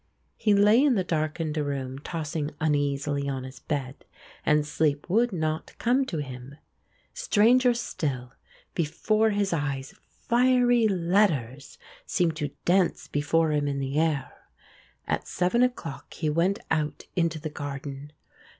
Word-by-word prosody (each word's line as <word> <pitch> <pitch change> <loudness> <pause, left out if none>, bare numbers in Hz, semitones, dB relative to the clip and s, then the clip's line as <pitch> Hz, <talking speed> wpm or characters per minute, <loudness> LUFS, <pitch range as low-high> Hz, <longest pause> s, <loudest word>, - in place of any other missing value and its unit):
He 210 -2 +2
lay 210 +6 +5
in 280 -4 +4
the 190 - +1
darkened 155 -1 -2
room 135 -3 -3
tossing 150 -1 -3
uneasily 145 -2 0
on 135 -2 -3
his 130 0 -9
bed 140 -3 -4 0.4
and 150 0 +3
sleep 150 -1 0
would 235 +4 +3
not 155 -3 -3
come 260 +3 +2
to 170 - -3
him. 130 -1 -7 0.6
Stranger 250 - +4
still, 130 - -3 0.4
before 215 +7 +1
his 205 -3 0
eyes 140 -4 -2 0.2
fiery 245 -1 +3
letters 170 - 0 0.3
seemed 170 -4 +1
to 150 -3 -2 0.2
dance 180 0 +2
before 155 +2 +1
him 145 -1 +1
in 140 -1 -1
the 135 +2 -1
air. 155 -4 0 0.7
At - - -2
seven 180 +7 +1
o'clock 245 - -2
he 155 -2 -1
went 175 +6 +2
out 155 -2 -1
into 170 -2 +1
the 155 0 -5
garden. 140 0 -6
155 Hz, 135 wpm, -27 LUFS, 145-200 Hz, 0.7 s, lay